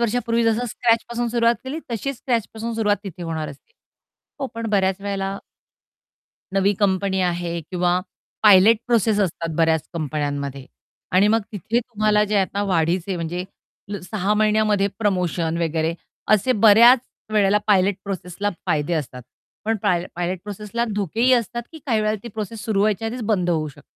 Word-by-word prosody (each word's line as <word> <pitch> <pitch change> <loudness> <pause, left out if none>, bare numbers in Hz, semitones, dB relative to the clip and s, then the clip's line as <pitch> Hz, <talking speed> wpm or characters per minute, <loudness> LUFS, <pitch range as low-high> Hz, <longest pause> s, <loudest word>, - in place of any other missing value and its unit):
वर्षापूर्वी 235 0 +1
जसं 225 +2 +1
स्क्रॅचपासून 235 +1 0
सुरुवात 235 0 +3
केली 275 +5 -4
तशीच 270 +4 -3
स्क्रॅचपासून 230 -1 -2
सुरुवात 210 -2 +2
तिथे 180 -3 -7
होणार 160 -2 -3
असते. 145 - -14 0.7
हो 270 - -1
पण 230 0 -4
बऱ्याच 190 -2 +1
वेळेला 195 -1 -3 1.2
नवी 195 +1 +3
कंपनी 190 -1 +1
आहे 175 -1 -1
किंवा 180 0 +1 0.4
पायलट 210 +2 +7
प्रोसेस 225 -3 +2
असतात 165 -4 -2
बऱ्याच 160 -2 +3
कंपन्यांमध्ये 145 -3 -3 0.5
आणि 195 +3 +5
मग 225 +1 +3
तिथे 215 +4 -1
तुम्हाला 215 -3 +1
जे 210 0 -1
आता 200 +1 0
वाढीचे 180 0 0
म्हणजे 175 +2 -3 0.6
6 200 +2 -1
महिन्यामध्ये 215 -1 +2
प्रमोशन 180 -5 0
वगैरे, 165 0 0 0.3
असे 215 +4 +4
बऱ्याच 230 +3 +7 0.3
वेळेला 205 -1 +4
पायलट 200 -1 +4
प्रोसेसला 195 +1 -3 0.2
फायदे 155 -2 0
असतात. 130 -5 -4 0.4
पण 225 +1 +1
पाय 180 -4 +1
पायलट 175 +1 -2
प्रोसेसला 210 +3 -3
धोकेही 220 +6 +1
असतात 240 0 +1
की 320 - -9
काही 225 -5 +2
वेळेला 215 0 0
ती 235 - -7
प्रोसेस 215 0 -6
सुरु 210 -3 0
व्हायच्या 215 +1 +1
आधीच 240 +2 -5
बंद 185 -5 +1
होऊ 155 -2 0
शकते. 140 - -15
200 Hz, 150 wpm, -22 LUFS, 175-225 Hz, 1.2 s, पायलट